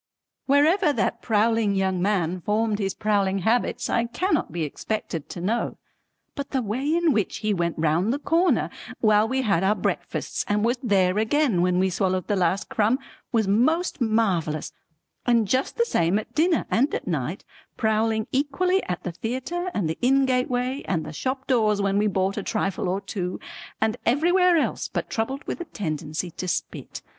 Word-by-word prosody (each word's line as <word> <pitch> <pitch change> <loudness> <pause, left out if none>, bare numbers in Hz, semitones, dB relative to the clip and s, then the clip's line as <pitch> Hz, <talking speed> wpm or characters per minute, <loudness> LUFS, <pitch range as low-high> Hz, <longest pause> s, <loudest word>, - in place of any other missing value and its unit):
Wherever 305 +5 +4
that - - -1
prowling 220 -2 +2
young 190 -2 0
man 185 -3 0
formed 215 +2 0
his 195 -2 -1
prowling 200 -2 +1
habits 235 +2 +1
I 235 - +1
cannot 365 +12 -1
be 170 -2 -2
expected 165 +1 -4
to - - -7
know, 220 +6 -1 0.6
but 280 -2 -5
the 260 -2 -1
way 225 +5 -2
in 340 -3 +3
which 215 -4 0
he 215 - +2
went 170 -3 -1
round 165 +6 +1
the 275 - 0
corner 335 +5 +2 0.3
while 215 -1 +4
we 265 +2 0
had 195 -6 +2
our 200 +2 +3
breakfasts - - -2
and 210 +1 +1
was 240 +2 +1
there 195 -5 +2
again 220 - +2
when 180 0 +2
we 190 +1 +2
swallowed 185 -1 0
the 205 - 0
last 185 +1 +1
crumb 220 +4 +2 0.3
was 225 -4 +2
most 290 - +1
marvellous, 190 -10 0 0.5
and 230 -3 +3
just 260 +6 0
the 470 - +3
same 170 - +1
at 215 - -6
dinner 330 +1 +2
and 270 +6 +2
at - - -4
night, - - -3 0.3
prowling 220 0 +1
equally 330 +8 +1
at 180 - -3
the 180 - -3
theatre 260 - -3
and 190 -6 0
the 160 - -4
inn 270 +2 +4
gateway 255 +1 0
and 165 -4 -1
the - - -7
shop 260 - -3
doors 215 -5 +2
when 200 0 +1
we 210 - +2
bought 195 0 0
a - - -1
trifle 195 -3 -1
or 190 +2 -1
two 185 -2 -4 0.4
and 220 +2 +1
everywhere 350 +7 +4
else 310 - -1
but - - -4
troubled 265 +6 -2
with - - -5
a - - -4
tendency 155 - -4
to 185 - -6
spit. - - -4
215 Hz, 180 wpm, -24 LUFS, 190-260 Hz, 0.6 s, Wherever